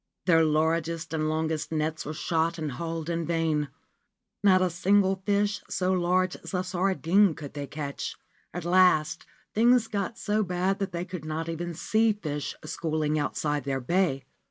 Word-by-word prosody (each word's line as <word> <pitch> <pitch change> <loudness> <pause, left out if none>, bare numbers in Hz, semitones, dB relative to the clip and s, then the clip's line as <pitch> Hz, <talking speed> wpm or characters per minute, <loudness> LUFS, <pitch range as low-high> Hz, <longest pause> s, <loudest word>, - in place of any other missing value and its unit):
Their 165 -3 +5
largest 160 +1 0
and 155 -1 0
longest 160 0 -1
nets 155 0 -2
were 155 - -4
shot 165 +1 0
and 155 -3 -3
hauled 165 +4 -4
in 170 0 -1
vain. 160 -3 0 0.7
Not 190 -2 +6
a 180 - +1
single 190 +2 +2
fish 205 0 +1
so 185 0 0
large 185 +1 +1
as - - -7
a 180 - 0
sardine 185 0 +2
could 145 -2 -8
they 145 -1 -5
catch. 140 0 -5 0.4
At 175 -1 -6
last 175 -4 +3 0.3
things 235 +1 +4
got 205 +2 -3
so 210 -1 0
bad 185 0 0
that 195 - -2
they 175 +1 -3
could 180 -4 -7
not 160 +1 -3
even 170 +1 -4
see 220 +6 +2
fish 150 -8 -4
schooling 155 -1 -1
outside 145 -1 -1
their 135 0 -1
bay. 135 0 +1
170 Hz, 165 wpm, -27 LUFS, 155-185 Hz, 0.7 s, Not